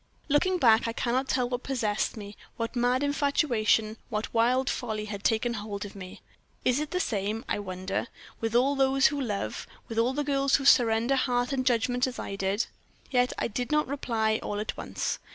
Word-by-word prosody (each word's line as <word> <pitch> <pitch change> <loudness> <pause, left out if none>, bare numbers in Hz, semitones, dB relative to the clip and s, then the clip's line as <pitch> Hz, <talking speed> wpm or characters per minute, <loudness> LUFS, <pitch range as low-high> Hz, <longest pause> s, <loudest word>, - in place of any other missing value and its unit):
"Looking 365 +6 +3
back, 230 -7 +5
I 230 - -2
cannot 255 +3 0
tell 250 -2 +1
what 245 0 -3
possessed 225 -6 -1
me 205 -1 -8 0.2
what 230 +1 -3
mad 245 +2 +2
infatuation, 245 -7 +1
what 215 +1 -3
wild 250 +3 +3
folly 215 -3 -2
had 205 -1 -6
taken 235 +1 +1
hold 205 -2 -5
of 205 - -10
me. 185 -2 -9 0.4
Is 250 +2 +3
it 300 0 -3
the 365 - -1
same, 215 - -2
I - - -1
wonder, 185 +2 -3 0.3
with 225 0 -2
all 270 +4 +4
those 270 0 +3
who 285 - -2
love 205 - -3 0.2
with 225 0 -2
all 245 +3 +2
girls 275 -2 +2
who 275 - 0
surrender 235 -1 +5
heart 245 0 0
and 255 -1 -1
judgment 245 +1 +2
as 255 - -6
I 200 - -5
did? 195 +3 0 0.5
Yet 250 -1 +3
I - - 0
did 245 +5 -4
not 300 0 +3
reply 225 -5 0
all 205 - -3
at 215 - -3
once. - - -3
240 Hz, 190 wpm, -28 LUFS, 215-265 Hz, 0.5 s, back